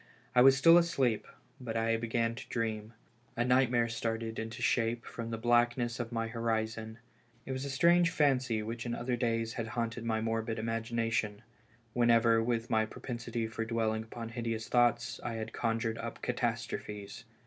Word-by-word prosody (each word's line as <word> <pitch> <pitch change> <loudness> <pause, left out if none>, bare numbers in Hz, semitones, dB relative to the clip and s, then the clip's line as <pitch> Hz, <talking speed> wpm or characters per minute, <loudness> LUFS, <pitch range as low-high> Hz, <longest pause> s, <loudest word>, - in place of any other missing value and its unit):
I 125 - +6
was 135 +1 +7
still 165 +4 +8
asleep, 135 -10 +1 0.3
but 115 -3 -4
I 115 0 +2
began 115 0 0
to 115 - -10
dream; 110 -1 -3 0.4
a 120 - +2
nightmare 125 -2 +3
started 115 -1 -3
into 110 0 -5
shape 115 0 +1
from 115 -1 -6
the 115 - -3
blackness 120 +1 +2
of 120 -1 -4
my 115 -1 -1
horizon; 110 -1 -2 0.5
it - - -5
was 130 +1 -3
a - - -4
strange 170 +5 +4
fancy 130 -8 +1
which 115 +2 -5
in 120 -1 -3
other 120 +1 -1
days 115 -2 -1
had 115 -3 -3
haunted 115 0 -2
my 110 -1 0
morbid 115 0 -1
imagination, 115 -1 -1 0.5
whenever 115 -1 +4
with 115 0 -1
my 110 0 +2
propensity 115 +1 -4
for 115 0 -4
dwelling 110 -1 0
upon 115 +1 -7
hideous 115 -1 -3
thoughts 120 0 +2
I 120 - -3
had 110 0 -5
conjured 115 0 -1
up - - -6
catastrophes. 105 +1 -3
115 Hz, 165 wpm, -32 LUFS, 115-120 Hz, 0.5 s, still